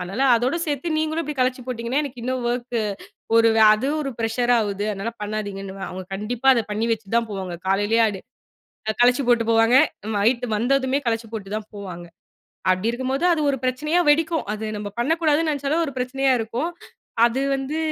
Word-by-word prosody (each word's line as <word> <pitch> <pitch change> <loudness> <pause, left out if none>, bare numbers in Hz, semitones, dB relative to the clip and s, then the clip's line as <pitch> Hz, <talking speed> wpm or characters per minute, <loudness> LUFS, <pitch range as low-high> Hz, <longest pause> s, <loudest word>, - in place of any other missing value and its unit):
அதுனால 195 +8 -3
அதோட 250 +7 0
சேத்து 305 +2 -2
நீங்களும் 315 +1 -1
இப்டி 300 0 -5
கழிச்சு 255 0 +1
போட்டிங்கன்னா 245 +3 -1
எனக்கு 250 -4 -7
இன்னும் 255 -1 -2
வொர்க் 240 0 -2 0.6
ஒரு 230 0 +6 0.3
அது 220 +6 -2
ஒரு 275 -2 -3
பிரஷர் 240 +2 +1
ஆகுது, 205 -2 -1
அதுனால 200 +4 -4
பண்ணாதீங்கன்னு. 205 -2 -4 0.2
அவுங்க 185 0 -7
கண்டிப்பா 235 +6 -1
அத 235 - +1
பண்ணி 220 +2 -1
வச்சுதான் 225 +1 -1
போவாங்க. 190 -3 -4
காலலேயே 205 +4 +2
அது 195 -3 -5 0.8
கழச்சு 250 +3 +5
போட்டுப் 230 -1 +3
போவாங்க. 225 +2 +4 0.4
நைட் 235 +4 +2
வந்ததுமே 260 +3 +1
கழச்சு 225 0 -1
போட்டுதான் 215 0 -5
போவாங்க. 180 -4 -7 0.7
அப்டி 185 +4 +1
இருக்கும்போது 260 +5 -2
அது 325 - 0
ஒரு 275 - -1
பிரச்சனயா 290 +7 0
வெடிக்கும். 320 +2 +3
அத 215 0 -4
நம்ம 205 0 -5
பண்ணக்கூடாதுன்னு 315 +4 +2
நினச்சாலே 285 +1 -1
ஒரு 280 - -5
பிரச்சனயா 265 +1 +1
இருக்கும். 235 +9 -2 0.6
அது 240 +3 -1
வந்து 270 +3 -3
240 Hz, 160 wpm, -23 LUFS, 215-270 Hz, 0.8 s, ஒரு